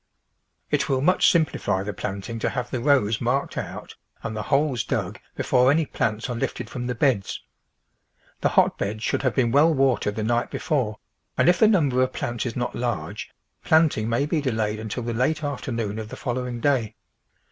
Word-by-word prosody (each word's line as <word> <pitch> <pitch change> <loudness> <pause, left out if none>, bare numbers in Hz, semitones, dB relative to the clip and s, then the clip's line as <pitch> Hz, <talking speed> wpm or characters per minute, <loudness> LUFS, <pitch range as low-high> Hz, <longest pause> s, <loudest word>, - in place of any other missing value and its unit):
It - - +1
will 130 -1 +1
much 180 +6 +4
simplify 105 - +1
the 105 +1 -4
planting 100 +3 -5
to - - 0
have 125 -1 -4
the 130 - -1
rows 120 -5 +2
marked 125 +4 0
out - - -6 0.3
and 110 - -4
the 105 - -2
holes 135 -2 +1
dug - - -3 0.2
before 125 0 +3
any 155 +3 +3
plants 110 -4 -2
are 125 - -3
lifted 115 - -3
from 120 -1 -4
the 125 - -2
beds. 115 -6 0 1.0
The - - +2
hotbeds 105 +2 +1
should - - 0
have 130 -4 0
been 120 -3 +2
well 145 +5 +5
watered 135 -7 +1
the 110 - -2
night 120 +2 0
before, 125 -10 -1 0.4
and - - +3
if 175 0 +5
the 220 - +7
number 145 - +3
of 130 0 +1
plants 120 +1 -3
is 115 - -5
not 120 -1 -2
large, 120 -11 -3 0.3
planting 155 -9 +3
may 120 +5 +1
be 155 +2 0
TRANSPLANTING 130 -5 -1
delayed 105 -1 -1
until 110 +2 -4
the 120 0 -2
late 145 +6 0
afternoon 115 -7 -3
of 110 -1 -6
the - - -7
following 125 -1 -3
day. 130 -6 +1
125 Hz, 190 wpm, -24 LUFS, 110-140 Hz, 1.0 s, the